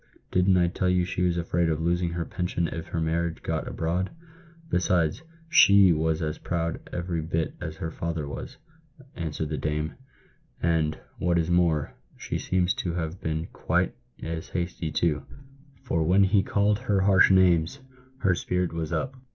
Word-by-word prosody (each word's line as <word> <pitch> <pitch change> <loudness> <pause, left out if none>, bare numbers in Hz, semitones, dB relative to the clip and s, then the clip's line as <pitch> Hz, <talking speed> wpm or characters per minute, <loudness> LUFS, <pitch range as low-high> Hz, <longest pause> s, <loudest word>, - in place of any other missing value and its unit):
Didn't 90 +1 +4
I 90 -1 +4
tell 90 +1 0
you 90 -1 +2
she 90 0 -3
was 90 -1 +2
afraid 85 0 0
of 80 -1 0
losing 85 +1 +1
her 85 -1 -2
pension 90 -1 -2
if 80 +1 -6
her 85 - -3
marriage 80 +1 -1
got - - -2
abroad? 90 +4 -1 0.6
Besides, 90 - +1 0.3
she 100 - +7
was 80 0 0
as 75 -1 -3
proud 85 -1 -2
every 85 -1 -2
bit 80 0 -2
as 80 - -5
her 80 0 -5
father 80 -3 -3
was," 70 - -7 0.6
answered 80 -2 -3
the 75 - -3
dame; 75 +1 -2 0.4
" - - -37
and, 80 -2 +1 0.2
what 85 0 +2
is 85 +1 0
more, 85 -4 +2 0.2
she - - -4
seems 90 -1 +1
to 85 - -2
have 85 +1 -4
been 80 +1 -2
quite - - 0 0.3
as 80 0 -4
hasty, 85 -2 -3
too; 75 -3 +1 0.6
for 85 - 0
when 90 +5 +4
he 95 +1 +4
called 100 +1 +1
her 105 -6 +1
harsh 95 -1 +6
names, 90 +1 +4 0.4
her 95 - +3
spirit 90 0 -1
was 80 -2 -3
up. 130 +1 -1
85 Hz, 170 wpm, -26 LUFS, 80-90 Hz, 0.6 s, she